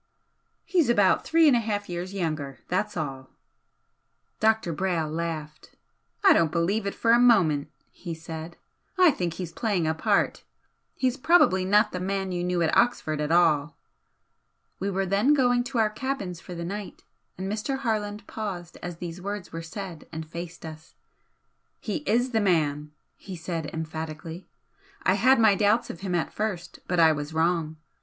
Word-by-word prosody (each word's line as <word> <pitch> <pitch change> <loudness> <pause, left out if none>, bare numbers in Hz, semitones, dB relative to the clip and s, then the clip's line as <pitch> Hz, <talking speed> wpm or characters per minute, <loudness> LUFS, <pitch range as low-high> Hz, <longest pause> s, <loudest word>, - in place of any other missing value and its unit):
"He's 345 -9 +2
about 205 -5 +4
three 325 0 +5
and 275 - +6
a - - +3
half 205 -2 -2
years 175 +1 -5
younger 155 -8 -3
that's 205 +2 -1
all." 135 -4 -4 1.1
Dr. 220 -6 +2
Brayle 165 -2 -1
laughed. 155 -2 -5 0.5
"I 390 -3 +8
don't 165 - +2
believe 190 +5 0
it 200 - -3
for 230 - +2
a 235 - +6
moment!" 180 -13 +4 0.2
he 170 -3 -7
said 160 +1 -8 0.4
"I 365 -3 +7
think 175 - -3
he's 180 -3 -5
playing 200 -3 -1
a 160 - +1
part. 160 - +1 0.5
He's 260 0 0
probably 220 - +4
not 210 +3 +4
the 180 - -4
man 190 +1 -2
you 175 -1 -2
knew 180 -1 0
at 160 - +1
Oxford 155 -11 +2
at 150 +1 -1
all." 160 -3 +3 1.0
We 195 - -1
were 195 0 -1
then 205 +10 +3
going 245 -3 +3
to 255 0 -4
our 220 -2 +3
cabins 215 -8 -4
for 180 - -9
the 170 0 -5
night, 200 +3 -6 0.3
and 190 +1 -4
Mr. 215 +7 -2
Harland 210 -5 -2
paused 185 -6 -6
as 175 -1 -6
these 175 +1 -7
words 200 -2 -5
were 165 - -4
said 175 -1 -8
and 160 -1 -6
faced 170 +1 -8
us. 155 0 -10 0.8
"He - - -3
IS 245 +4 +2
the 220 -2 +2
man!" 150 -6 +1 0.3
he 190 -2 -8
said, 165 -2 -4
emphatically 160 +2 -6 0.6
"I - - +4
had 260 -1 +4
my 220 -2 +6
doubts 210 +4 +2
of 170 - -11
him 190 -2 -2
at 170 - -1
first, 190 -5 -4
but 180 -1 0
I 160 -1 +7
was 150 +1 -4
wrong. 160 -1 0
180 Hz, 170 wpm, -26 LUFS, 165-215 Hz, 1.1 s, I